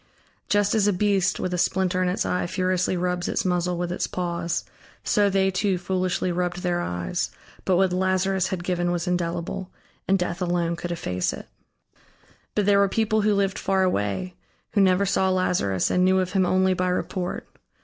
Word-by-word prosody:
Just 205 Hz, 0 st, +2 dB
as 210 Hz, -2 st, +3 dB
a 205 Hz, -, +3 dB
beast 195 Hz, -1 st, +1 dB
with 185 Hz, -, -2 dB
a 180 Hz, -, -1 dB
splinter 185 Hz, 0 st, +1 dB
in 180 Hz, -, +2 dB
its 180 Hz, -, -1 dB
eye 180 Hz, -, -1 dB
furiously 185 Hz, 0 st, 0 dB
rubs 180 Hz, 0 st, -1 dB
its -, -, -1 dB
muzzle 180 Hz, -1 st, 0 dB
with 175 Hz, 0 st, -2 dB
its 180 Hz, -, -2 dB
paws, 170 Hz, -1 st, -2 dB, 0.4 s
so 205 Hz, -2 st, +3 dB
they 190 Hz, 0 st, +2 dB
too 190 Hz, 0 st, 0 dB
foolishly 185 Hz, 0 st, -1 dB
rubbed 180 Hz, +1 st, -2 dB
their 175 Hz, -1 st, 0 dB
eyes, 90 Hz, -, -2 dB, 0.4 s
but 185 Hz, -, +3 dB
what 190 Hz, -1 st, +2 dB
Lazarus 190 Hz, 0 st, +1 dB
had 185 Hz, -2 st, -4 dB
given 175 Hz, -1 st, 0 dB
was 175 Hz, -1 st, -1 dB
indelible, 175 Hz, +1 st, -2 dB, 0.4 s
and 195 Hz, -, +4 dB
Death 180 Hz, -1 st, -3 dB
alone 175 Hz, -1 st, 0 dB
could 175 Hz, +1 st, -5 dB
efface 90 Hz, -, -2 dB
it. -, -, -9 dB, 1.1 s
But 210 Hz, -, +1 dB
there 200 Hz, 0 st, +4 dB
were 200 Hz, -1 st, +3 dB
people 220 Hz, +1 st, +1 dB
who 210 Hz, 0 st, +2 dB
lived 195 Hz, -1 st, 0 dB
far 190 Hz, -1 st, +1 dB
away, 105 Hz, -, -1 dB, 0.4 s
who 205 Hz, -, +3 dB
never 190 Hz, +1 st, +4 dB
saw 190 Hz, 0 st, +2 dB
Lazarus 180 Hz, -, +1 dB
and 180 Hz, -, +3 dB
knew 185 Hz, 0 st, +4 dB
of 185 Hz, -1 st, -1 dB
him 190 Hz, -2 st, +2 dB
only 185 Hz, +1 st, +3 dB
by 185 Hz, 0 st, -1 dB
report. 180 Hz, 0 st, -3 dB
185 Hz, 190 wpm, -24 LUFS, 175-190 Hz, 1.1 s, and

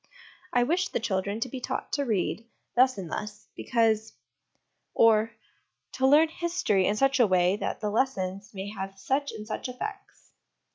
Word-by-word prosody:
' -, -, -25 dB
I 245 Hz, -, +4 dB
wish 350 Hz, +8 st, +1 dB
the -, -, -1 dB
children 200 Hz, -1 st, -2 dB
to 255 Hz, -, 0 dB
be 260 Hz, -, -6 dB
taught -, -, -4 dB
to 285 Hz, -1 st, 0 dB
read, 225 Hz, +1 st, -1 dB, 0.3 s
thus 255 Hz, 0 st, +4 dB
and 180 Hz, -4 st, -6 dB
thus, 210 Hz, 0 st, -6 dB
because 220 Hz, -2 st, +1 dB, 0.4 s
': -, -, -49 dB
or, 225 Hz, -1 st, +5 dB, 0.3 s
' -, -, -52 dB
to 265 Hz, 0 st, +3 dB
learn 305 Hz, +4 st, +6 dB
history 335 Hz, -, 0 dB
in 205 Hz, -, +1 dB
such 270 Hz, +4 st, +2 dB
a 240 Hz, -, +6 dB
way 185 Hz, 0 st, +3 dB
that -, -, -3 dB
the 210 Hz, -1 st, -1 dB
lessons 200 Hz, -5 st, -1 dB
may 195 Hz, 0 st, -6 dB
have 195 Hz, -2 st, -6 dB
such 270 Hz, +8 st, -1 dB
and 210 Hz, -, -8 dB
such 220 Hz, +3 st, -4 dB
effects.' 395 Hz, +11 st, -8 dB
225 Hz, 185 wpm, -27 LUFS, 200-265 Hz, 0.4 s, learn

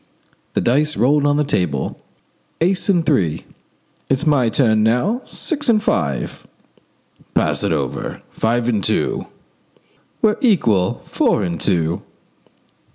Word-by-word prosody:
The -, -, +2 dB
dice 150 Hz, +5 st, +1 dB
rolled 145 Hz, +3 st, +3 dB
on 145 Hz, 0 st, +2 dB
the 150 Hz, -, +2 dB
table. 90 Hz, -, -2 dB, 0.6 s
"Ace 185 Hz, +4 st, +1 dB
and 175 Hz, -4 st, +3 dB
three." 85 Hz, -, 0 dB, 0.6 s
"It's 135 Hz, +4 st, +1 dB
my 140 Hz, -6 st, +3 dB
turn 110 Hz, -3 st, +2 dB
now. 125 Hz, -, +1 dB
Six 295 Hz, -5 st, -2 dB
and 225 Hz, -, +5 dB
five." 70 Hz, -, -2 dB, 0.9 s
"Pass -, -, +1 dB
it -, -, 0 dB
over. -, -, -3 dB
Five 115 Hz, +1 st, 0 dB
and 110 Hz, -5 st, 0 dB
two." -, -, 0 dB, 1.0 s
"We're 215 Hz, -1 st, +3 dB
equal. 115 Hz, -, +2 dB
Four -, -, +1 dB
and 85 Hz, -3 st, -3 dB
two." 85 Hz, -3 st, 0 dB
125 Hz, 125 wpm, -19 LUFS, 95-160 Hz, 1.0 s, and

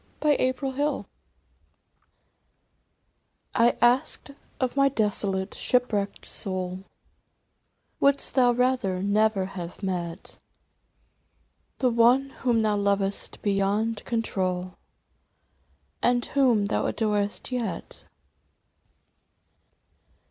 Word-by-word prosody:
82 270 Hz, -2 st, +2 dB
Worth 265 Hz, -1 st, -3 dB
while 295 Hz, +1 st, -1 dB, 2.5 s
I 235 Hz, 0 st, +3 dB
ASKED 250 Hz, +3 st, +2 dB, 0.3 s
of 255 Hz, 0 st, -1 dB
my 275 Hz, 0 st, +4 dB
desolate 205 Hz, -5 st, 0 dB
shipwrecked 215 Hz, -5 st, 0 dB
soul 185 Hz, 0 st, -3 dB, 0.6 s
" -, -, -48 dB
Wouldst 280 Hz, 0 st, +2 dB
thou 250 Hz, -2 st, +4 dB
rather 240 Hz, -7 st, 0 dB
never 205 Hz, -1 st, +2 dB
have 180 Hz, 0 st, -8 dB
met 180 Hz, -2 st, -4 dB, 1.4 s
The 255 Hz, -3 st, +2 dB
one 245 Hz, +4 st, +4 dB
whom 235 Hz, -3 st, +2 dB
thou 210 Hz, -1 st, +1 dB
lovedst 200 Hz, -1 st, -1 dB
beyond 205 Hz, +2 st, 0 dB
control 185 Hz, -5 st, -2 dB, 1.3 s
And 245 Hz, 0 st, +2 dB
whom 250 Hz, -7 st, +2 dB
thou 200 Hz, -, 0 dB
adorest 210 Hz, +1 st, -1 dB
yet 225 Hz, -9 st, -5 dB
215 Hz, 85 wpm, -26 LUFS, 195-250 Hz, 2.5 s, my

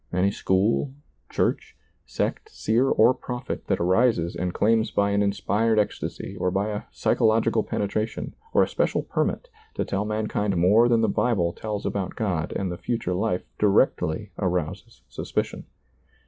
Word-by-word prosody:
Any 90 Hz, +2 st, +2 dB
school, 105 Hz, +8 st, +1 dB, 0.3 s
church, -, -, -1 dB, 0.3 s
sect, -, -, -2 dB
seer, 120 Hz, +5 st, +1 dB
or 115 Hz, +4 st, +5 dB
prophet 125 Hz, 0 st, -6 dB
that -, -, +1 dB
arises 95 Hz, -1 st, +2 dB
and 90 Hz, -1 st, -2 dB
claims 110 Hz, +4 st, +2 dB
by 100 Hz, 0 st, +1 dB
an 100 Hz, 0 st, +2 dB
inspired 105 Hz, +2 st, +1 dB
ecstasy 105 Hz, -, -2 dB
or 90 Hz, -, +1 dB
by 100 Hz, +3 st, -1 dB
a 105 Hz, -1 st, -3 dB
psychological 110 Hz, 0 st, +2 dB
penetration 110 Hz, +2 st, -3 dB, 0.2 s
or -, -, +5 dB
a -, -, 0 dB
special -, -, 0 dB
permit -, -, -1 dB, 0.3 s
to -, -, -1 dB
tell 100 Hz, +1 st, -2 dB
mankind 105 Hz, -2 st, -1 dB
more 105 Hz, +8 st, +5 dB
than 115 Hz, -1 st, +3 dB
the 110 Hz, -, +3 dB
Bible 100 Hz, -5 st, +1 dB
tells 105 Hz, -2 st, -5 dB
about 100 Hz, -2 st, -2 dB
God 90 Hz, -9 st, -1 dB
and 95 Hz, -2 st, -2 dB
the 85 Hz, -, -5 dB
future 115 Hz, -7 st, -2 dB
life 90 Hz, -1 st, -1 dB, 0.2 s
directly 105 Hz, -3 st, +2 dB
arouses 90 Hz, -, -3 dB
suspicion. -, -, -3 dB
105 Hz, 150 wpm, -25 LUFS, 95-115 Hz, 0.3 s, or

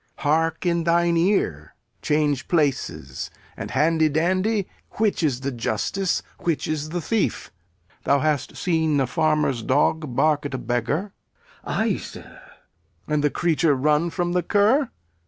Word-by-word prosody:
Hark 165 Hz, +3 st, 0 dB
in 170 Hz, -1 st, +1 dB
thine 170 Hz, 0 st, +3 dB
ear. 165 Hz, -, 0 dB, 0.3 s
Change 150 Hz, -2 st, 0 dB
places 140 Hz, -, -1 dB, 0.3 s
and, -, -, -6 dB
handy 160 Hz, 0 st, +2 dB
dandy, 185 Hz, +6 st, +1 dB, 0.3 s
which 215 Hz, -4 st, 0 dB
is 135 Hz, -6 st, 0 dB
the 140 Hz, +1 st, -2 dB
justice, 125 Hz, -, -1 dB, 0.2 s
which 165 Hz, -3 st, -1 dB
is 155 Hz, -1 st, -2 dB
the 175 Hz, +2 st, -2 dB
thief? 220 Hz, +6 st, -1 dB, 0.5 s
Thou 140 Hz, -, +4 dB
hast 150 Hz, -1 st, -1 dB
seen 160 Hz, -4 st, +1 dB
a 135 Hz, -, +2 dB
farmer's 150 Hz, -1 st, +1 dB
dog 145 Hz, +2 st, +1 dB
bark 150 Hz, 0 st, +2 dB
at 140 Hz, -2 st, -4 dB
a -, -, -1 dB
beggar? 125 Hz, -, -2 dB, 0.5 s
Glou. -, -, -6 dB
Ay, -, -, +1 dB
sir. -, -, -9 dB
Lear. 150 Hz, -, -14 dB
And 150 Hz, -1 st, +1 dB
the 150 Hz, -, +4 dB
creature 165 Hz, -2 st, +2 dB
run 150 Hz, +5 st, +2 dB
from 175 Hz, 0 st, -2 dB
the 180 Hz, 0 st, +1 dB
cur? 215 Hz, -, +3 dB
155 Hz, 150 wpm, -23 LUFS, 145-175 Hz, 0.5 s, Thou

